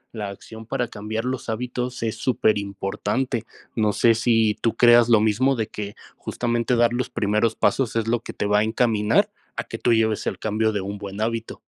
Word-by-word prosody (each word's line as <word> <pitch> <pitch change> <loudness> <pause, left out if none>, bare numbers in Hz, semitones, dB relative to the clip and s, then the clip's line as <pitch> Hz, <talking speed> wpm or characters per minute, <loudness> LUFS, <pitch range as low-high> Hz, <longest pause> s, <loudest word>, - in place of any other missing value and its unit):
La 105 -2 -4
acción 110 +3 -11
para 120 0 -2
cambiar 110 +2 -4
los 130 -2 -3
hábitos 125 +2 -3
es 110 -1 -2
superimportante. 105 +1 -1 0.3
No 105 -2 +1
sé 115 - +4
si 115 -2 +2
tú 115 - 0
creas 120 -1 +6
lo 115 -2 +6
mismo 120 +6 +2
de 110 -3 -1
que 105 -2 -7 0.2
justamente 120 0 -1
dar 120 0 +3
los 125 0 -2
primeros 110 +1 0
pasos 130 -4 +1
es 115 -1 0
lo 120 +1 +1
que 115 - -8
te - - -3
va 105 0 +3
a - - +3
encaminar 110 -1 +2 0.2
a - - -3
que - - -8
tú 120 - +2
lleves 110 -2 +1
el - - -2
cambio 110 +1 0
de 105 -2 -2
un 100 +1 -5
buen 100 0 -7
hábito. 115 +1 -3
110 Hz, 200 wpm, -23 LUFS, 105-120 Hz, 0.3 s, creas